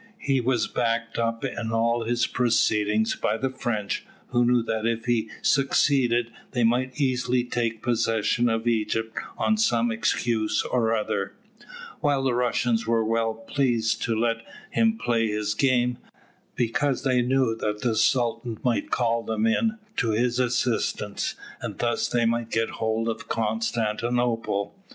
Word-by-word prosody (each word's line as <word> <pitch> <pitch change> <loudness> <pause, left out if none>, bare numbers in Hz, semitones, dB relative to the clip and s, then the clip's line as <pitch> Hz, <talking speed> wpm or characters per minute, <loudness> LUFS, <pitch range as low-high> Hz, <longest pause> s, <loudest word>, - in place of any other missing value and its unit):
He 135 -9 0
was 120 -2 +1
backed 115 -1 -1
up 115 +1 -1
in 120 -3 -3
all 115 +1 +1
his 120 +1 +1
proceedings 110 -3 +2
by - - 0
the 130 +2 -1
French, 120 -6 -2 0.3
who 120 - +2
knew 120 -1 +3
that 110 0 -1
if 115 -1 -1
he 115 -2 +1
succeeded 130 -4 +2 0.2
they 120 -2 +1
might 125 +4 +1
easily 125 -2 +1
take 115 -2 -2
possession 115 0 +1
of 115 0 -1
Egypt 110 0 0 0.2
on 220 - +2
some 120 - +2
excuse 110 -1 0
or 115 -2 +1
other; 110 - -2 0.6
while 145 -3 +1
the 130 -2 +1
Russians 120 -1 +1
were 115 -1 +2
well 115 0 0
pleased 115 -1 0
to 115 - 0
let 115 0 +1 0.3
him 225 -1 +2
play 115 - +1
his 105 0 -1
game, 125 0 +1 0.6
because 125 +4 0
they 130 -3 +3
knew 125 -2 +2
that 105 -1 -2
the 115 -1 +1
Sultan 115 0 +1
might 125 -2 0
call 115 -1 +1
them 110 -1 -1
in 220 - +1 0.2
to 115 - +1
his 120 +2 +1
assistance, 120 -4 -1 0.3
and - - -5
thus 120 -1 0
they 120 -1 +1
might 115 0 0
get 115 0 0
hold 110 +1 0
of 115 - -4
Constantinople. 115 0 -1
115 Hz, 150 wpm, -25 LUFS, 115-125 Hz, 0.6 s, knew